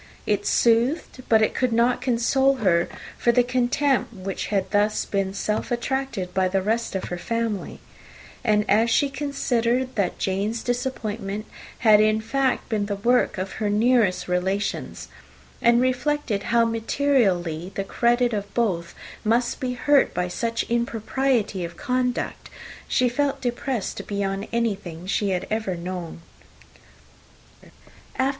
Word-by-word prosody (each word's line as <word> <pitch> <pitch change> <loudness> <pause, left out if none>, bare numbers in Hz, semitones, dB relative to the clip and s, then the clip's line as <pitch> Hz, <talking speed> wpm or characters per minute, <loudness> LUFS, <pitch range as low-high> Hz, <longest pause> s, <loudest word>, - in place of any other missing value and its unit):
It 205 -1 0
soothed, 240 +4 +2
but 220 -1 +5
it - - +1
could 255 -2 0
not 235 +2 +2
console 265 +3 +2
her 185 -8 +2 0.3
for 240 - +4
the 245 +1 +4
contempt 250 +1 +1
which 190 0 -4
had 195 -2 0
been 205 0 +4 0.2
thus 195 -1 -1
self 210 +1 -1
attracted 240 -6 -2
by 190 0 +2
the 190 +1 0
rest 225 +1 -1
of 190 - -2
her 175 - -4
family; 230 +1 -3 0.6
and 210 -3 +2
as 225 +3 +3
she 275 +4 +2
considered 255 -3 0
that 200 -4 -1
Jane's 205 +4 -1
disappointment 225 -4 -3 0.4
had, 215 -1 +8
in 215 0 +3
fact, 260 +4 0
been 210 -3 -1
the 205 - -2
work 240 +2 +2
of 185 +1 -3
her 210 - +1
nearest 215 -3 +2
relations, 190 +3 -2 0.5
and 235 0 +5
reflected 255 -3 0
how 235 0 +4
materially 220 - 0
the 195 - -1
credit 240 +4 +1
of 205 -1 -3
both 180 -8 -1 0.3
must 235 +2 +1
be 255 -3 -2
hurt 280 +3 +3
by 180 0 0
such 230 +5 -2
impropriety 235 -2 0
of 170 0 -7
conduct, 250 +3 -2 0.4
she 250 - +2
felt 275 +2 0
depressed 245 -3 -3
beyond 200 0 -2
anything 200 -8 -2
she 200 +1 0
had 180 -2 -1
ever 215 -4 -1
known 170 -1 -6 1.4
before. - - -19
225 Hz, 140 wpm, -24 LUFS, 195-245 Hz, 1.4 s, had